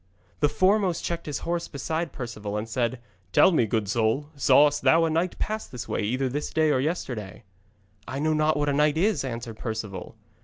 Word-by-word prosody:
The 150 - +3
foremost 190 -1 +2
checked 170 -2 -3
his 150 - -2
horse 170 0 -1
beside 160 +3 -3
Perceval, 105 -5 -5
and 105 +2 -3
said: 120 +1 -1 0.3
'Tell - - +6
me, 120 -10 +2
good 110 -1 -1
soul, 115 +7 0
sawest 145 +1 +4
thou 165 0 +5
a 160 - 0
knight 170 +3 0
pass 215 +1 -3
this 125 -3 -7
way - - -1
either 130 +6 0
this 145 +4 -3
day 155 -1 +2
or 130 - +2
yesterday?' 125 - -4 0.6
'I 130 - -4
know 155 +2 +1
not 155 0 +2
what 145 0 0
a - - +1
knight 150 +1 +2
is,' 205 +1 +2
answered 115 -3 -6
Perceval. 110 -5 -5
145 Hz, 195 wpm, -26 LUFS, 115-160 Hz, 0.6 s, Tell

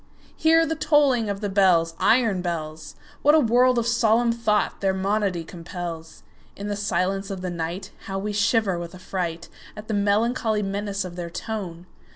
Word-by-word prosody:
Hear 325 +1 +4
the 320 - -1
tolling 290 -8 +2
of 200 0 -3
the 205 - -1
bells, 180 -4 +3
Iron 215 -1 +3
bells! 155 -3 -5 0.3
What 295 +2 +5
a - - +6
world 250 0 +4
of 235 - +1
solemn 235 0 +3
thought 230 -3 0
their 190 -1 +1
monody 195 -2 0
compels! 170 -1 -8 0.3
In 205 +1 -6
the 205 - -1
silence 195 0 -1
of 195 -2 -5
the 185 -1 -3
nightHow 175 +3 -5
we 210 +1 -3
shiver 205 -3 +1
with 170 -1 -7
affrightAt 175 -2 -4 0.4
the 220 - -4
melancholy 210 +2 +1
menace 200 0 -3
of 180 -1 -8
their 175 -1 -4
tone! 180 -3 -6
200 Hz, 165 wpm, -24 LUFS, 175-225 Hz, 0.4 s, a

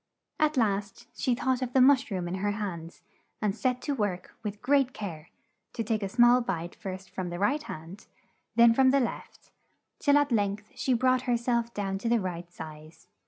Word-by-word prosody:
At 305 -1 +2
last, 205 -3 0
she 250 - +1
thought 260 0 0
of 250 -1 -3
the 265 - +4
mush 270 +1 +5
room 185 -4 -3
in 175 - -4
her 205 0 0
hands, 175 -6 -6 0.4
and 210 -2 0
set 250 +1 -1
to 290 - -1
work 205 -8 -3
with 210 -2 -5
great 270 +1 +2
care, 170 -7 -7 0.4
to 230 - -2
take 220 0 -1
a 195 - -2
small 240 +3 +5
bite 175 -6 -3
first 190 -1 -8
from 185 -2 -4
the 175 - -5
right 270 +11 +1
hand, 165 - -9 0.5
then 235 0 +7
from 260 +2 +5
the 275 +1 +4
left, 245 - -5 0.5
till 285 -1 +4
at 290 -1 +2
length 205 -1 -1
she 260 - 0
brought 255 +1 +3
her 240 - +3
self 235 0 0
down 195 -1 -2
to 230 - -2
the 235 0 +3
right 175 -2 -5
size. 155 -1 -11
220 Hz, 200 wpm, -28 LUFS, 190-250 Hz, 0.5 s, then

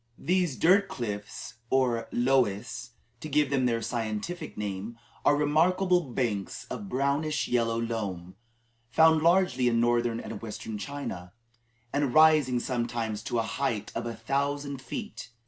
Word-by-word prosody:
These 180 -6 0
dirt 195 +4 +5
cliffs, 105 0 -6
or 125 -3 +1
"loess," 120 -2 0 0.3
to 155 - -7
give 145 -1 +2
them 130 -2 +2
their 115 -1 0
scientific 120 +10 -4
name, 105 +2 -4 0.3
are 145 - +5
remarkable 175 +5 +3
banks 110 -6 -2
of 205 -2 -5
brownish 145 +3 0
yellow 115 -2 +1
loam, 100 -6 -4 0.6
found 160 +3 +5
largely 165 -7 +3
in 115 -1 +2
Northern 120 -1 +2
and - - -7
Western 110 -1 -6
China, 100 -10 -6 0.6
and 140 -3 0
rising 155 -5 +6
sometimes 120 -3 -2
to 120 - -2
a 115 - +2
height 110 -3 -2
of - - -3
a 115 - -4
thousand 140 +4 -2
feet. 125 -1 -6
125 Hz, 135 wpm, -28 LUFS, 115-145 Hz, 0.6 s, rising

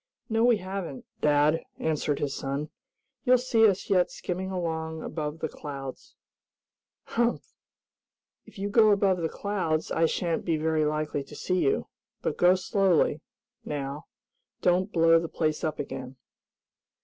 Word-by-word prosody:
"No 225 0 +2
we 240 -2 +5
haven't, 185 -6 -6 0.2
dad," 150 +2 +3
answered 150 -2 0
his 140 -2 -2
son. 140 +2 -3 0.5
"You'll 255 0 +5
see 235 -3 +4
us 195 -3 0
yet 185 -3 +3
skimming 185 +1 -4
along 160 -3 -3
above 150 -1 -4
the 160 - -2
clouds." 140 -4 -8 0.9
"Humph! 235 +1 -1 0.9
If - - -15
you 200 +1 -2
go 215 +1 +5
above 195 -3 +3
the 160 - 0
clouds 180 -6 -2
I 165 0 +3
shan't 170 0 -1
be 165 -2 0
very 155 0 +1
likely 150 -1 -1
to - - -12
see 185 0 -1
you. 420 - +1 0.4
But - - -1
go 180 +1 +6
slowly, 185 -5 +2 0.4
now. 140 0 -5 0.6
Don't 185 +3 +2
blow 165 -1 +5
the 165 -1 -4
place 155 -2 -1
up 155 -1 -1
again." 130 -1 -6
165 Hz, 145 wpm, -27 LUFS, 150-190 Hz, 0.9 s, go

